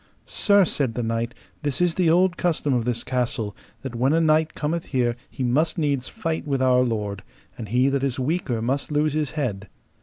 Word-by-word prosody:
Sir, 200 Hz, -2 st, +3 dB
said 135 Hz, -7 st, -1 dB
the 120 Hz, -, -1 dB
knight, 115 Hz, +1 st, -2 dB, 0.3 s
this 145 Hz, -4 st, -1 dB
is 175 Hz, -1 st, +2 dB
the 180 Hz, -2 st, +2 dB
old 180 Hz, +2 st, +4 dB
custom 160 Hz, -6 st, 0 dB
of 120 Hz, -2 st, 0 dB
this 120 Hz, -1 st, -1 dB
castle, 120 Hz, -4 st, -2 dB, 0.3 s
that 135 Hz, -3 st, -5 dB
when 130 Hz, +5 st, +2 dB
a 165 Hz, -, +4 dB
knight 155 Hz, 0 st, +2 dB
cometh 160 Hz, +2 st, -2 dB
here 120 Hz, -3 st, 0 dB
he 130 Hz, -, -5 dB
must 150 Hz, +8 st, +1 dB
needs 140 Hz, -5 st, 0 dB
fight 165 Hz, -7 st, -3 dB
with 140 Hz, -2 st, 0 dB
our 130 Hz, -1 st, +4 dB
lord, 105 Hz, -5 st, -2 dB, 0.3 s
and 110 Hz, -4 st, -7 dB
he 125 Hz, +4 st, +3 dB
that 140 Hz, -1 st, 0 dB
is 135 Hz, -3 st, -1 dB
weaker 130 Hz, -5 st, -1 dB
must 135 Hz, +5 st, -1 dB
lose 150 Hz, 0 st, +1 dB
his 150 Hz, -2 st, 0 dB
head. 105 Hz, -9 st, -2 dB
135 Hz, 205 wpm, -24 LUFS, 120-155 Hz, 0.3 s, old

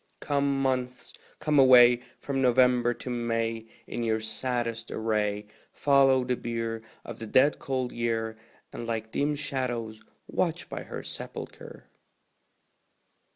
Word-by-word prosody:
Come, 140 Hz, -1 st, 0 dB
Months, 125 Hz, -1 st, -2 dB, 0.2 s
come 150 Hz, -2 st, +2 dB
away, 125 Hz, -2 st, +8 dB, 0.2 s
From 135 Hz, -1 st, -2 dB
November 125 Hz, -1 st, +4 dB
to 125 Hz, -, -7 dB
May, 115 Hz, -1 st, -2 dB, 0.2 s
In -, -, -5 dB
your 110 Hz, -1 st, +1 dB
saddest 115 Hz, +1 st, -2 dB
array; 105 Hz, -2 st, -1 dB, 0.3 s
Follow 135 Hz, -2 st, +4 dB
the 125 Hz, 0 st, 0 dB
bier 115 Hz, -1 st, -3 dB, 0.2 s
Of 120 Hz, -1 st, -7 dB
the 115 Hz, -, -5 dB
dead 130 Hz, +7 st, +4 dB
cold 130 Hz, -2 st, -2 dB
Year, 115 Hz, -1 st, -2 dB, 0.4 s
And 115 Hz, -, -6 dB
like 110 Hz, -1 st, -3 dB
dim 145 Hz, +1 st, 0 dB
shadows 120 Hz, -6 st, -3 dB, 0.2 s
watch -, -, -1 dB
by -, -, -5 dB
her -, -, -7 dB
sepulchre. -, -, -8 dB
120 Hz, 125 wpm, -28 LUFS, 115-130 Hz, 0.4 s, away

